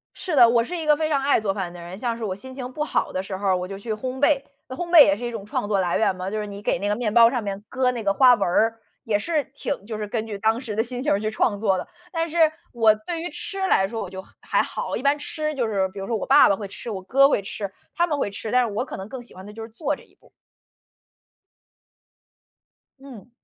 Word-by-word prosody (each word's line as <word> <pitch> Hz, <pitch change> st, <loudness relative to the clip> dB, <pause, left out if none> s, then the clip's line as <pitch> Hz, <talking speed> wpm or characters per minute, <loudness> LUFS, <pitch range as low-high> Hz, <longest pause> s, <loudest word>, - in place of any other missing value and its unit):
是 355 Hz, -5 st, -4 dB
的， 240 Hz, -4 st, +8 dB
我 235 Hz, -1 st, +3 dB
是 355 Hz, +5 st, -5 dB
一 320 Hz, -2 st, -4 dB
个 300 Hz, -1 st, +5 dB
非 310 Hz, 0 st, -1 dB
常 285 Hz, -3 st, +1 dB
爱 280 Hz, -4 st, +3 dB
做 195 Hz, -2 st, -1 dB
饭 185 Hz, -4 st, -4 dB
的 175 Hz, -, -10 dB
人。 175 Hz, +3 st, -8 dB
像 235 Hz, -1 st, -2 dB
是 230 Hz, -, -5 dB
我 190 Hz, -3 st, -2 dB
心 260 Hz, +6 st, -11 dB
情 255 Hz, -1 st, -6 dB
不 300 Hz, -, -3 dB
好 -, -, -1 dB
的 185 Hz, -, -2 dB
时 190 Hz, 0 st, -5 dB
候 190 Hz, -1 st, +1 dB
我 180 Hz, 0 st, -4 dB
就 195 Hz, 0 st, -6 dB
去 220 Hz, +2 st, -4 dB
烘 255 Hz, +4 st, -5 dB
焙， 285 Hz, -2 st, +4 dB, 0.3 s
那 260 Hz, -, -7 dB
烘 345 Hz, -1 st, -4 dB
焙 335 Hz, -3 st, +9 dB
也 195 Hz, 0 st, +3 dB
是 240 Hz, -, -7 dB
一 240 Hz, -, -2 dB
种 220 Hz, -4 st, -6 dB
创 205 Hz, -, -2 dB
作 200 Hz, -2 st, +2 dB
来 175 Hz, -2 st, +1 dB
源 195 Hz, -, +2 dB
嘛， 185 Hz, +1 st, -4 dB
就 215 Hz, -, -3 dB
是 210 Hz, -, -4 dB
你 200 Hz, 0 st, -8 dB
给 -, -, 0 dB
那 205 Hz, +2 st, -2 dB
个 210 Hz, -, +1 dB
面 225 Hz, -4 st, -1 dB
包 230 Hz, 0 st, +8 dB
上 245 Hz, -4 st, -2 dB
面 200 Hz, 0 st, -4 dB
搁 260 Hz, -1 st, +1 dB
那 235 Hz, -2 st, -4 dB
个 200 Hz, -1 st, +2 dB
花 250 Hz, +2 st, +7 dB
纹 205 Hz, -, -4 dB
儿， 225 Hz, +5 st, +2 dB, 0.2 s
也 210 Hz, -2 st, +1 dB
是 305 Hz, +3 st, -1 dB
挺 275 Hz, -7 st, -4 dB
就 220 Hz, -1 st, -5 dB
是 210 Hz, -, -3 dB
根 220 Hz, +1 st, -2 dB
据 205 Hz, -2 st, -5 dB
当 220 Hz, +3 st, +1 dB
时 225 Hz, -6 st, -5 dB
的 220 Hz, -, +2 dB
心 250 Hz, +1 st, -5 dB
情 240 Hz, -9 st, +2 dB
去 215 Hz, 0 st, -1 dB
创 210 Hz, -1 st, 0 dB
作 195 Hz, -4 st, +2 dB
的。 -, -, -5 dB, 0.3 s
但 330 Hz, 0 st, -1 dB
是， 340 Hz, +2 st, -4 dB, 0.3 s
我 225 Hz, -3 st, +5 dB
对 325 Hz, +11 st, -5 dB
于 350 Hz, -, -4 dB
吃 390 Hz, -, -7 dB
来 190 Hz, -, +4 dB
说 225 Hz, +3 st, -4 dB
我 185 Hz, -, -6 dB
就 190 Hz, 0 st, -8 dB, 0.2 s
还 -, -, +1 dB
好， -, -, -5 dB
我 -, -, -1 dB
一 -, -, -7 dB
般 280 Hz, +1 st, +3 dB
吃 305 Hz, +1 st, -4 dB
就 245 Hz, -4 st, 0 dB
是 195 Hz, -3 st, 0 dB
比 195 Hz, +1 st, -9 dB
如 195 Hz, -, -5 dB
说 230 Hz, -, 0 dB
我 -, -, -4 dB
爸 280 Hz, +2 st, +7 dB
爸 200 Hz, -, +2 dB
会 205 Hz, -, -6 dB
吃， 225 Hz, +4 st, -8 dB
我 190 Hz, -3 st, -5 dB
哥 275 Hz, +8 st, +5 dB
会 205 Hz, -, +2 dB
吃， 200 Hz, 0 st, -6 dB, 0.2 s
他 345 Hz, 0 st, +2 dB
们 295 Hz, -3 st, -1 dB
会 205 Hz, -, -1 dB
吃， 210 Hz, +2 st, -6 dB
但 250 Hz, -1 st, +3 dB
是 210 Hz, -, -5 dB
我 235 Hz, +5 st, -1 dB
可 -, -, -7 dB
能 190 Hz, +1 st, -7 dB
更 255 Hz, +1 st, -7 dB
喜 240 Hz, -, -18 dB
欢 190 Hz, +2 st, -11 dB
的 210 Hz, -, -10 dB
就 225 Hz, +1 st, -8 dB
是 225 Hz, -, -7 dB
做 225 Hz, -, -2 dB
这 -, -, -14 dB
一 -, -, -26 dB
步。 -, -, -25 dB, 2.7 s
嗯。 250 Hz, -5 st, -13 dB
225 Hz, 310 characters per minute, -24 LUFS, 200-260 Hz, 2.7 s, 焙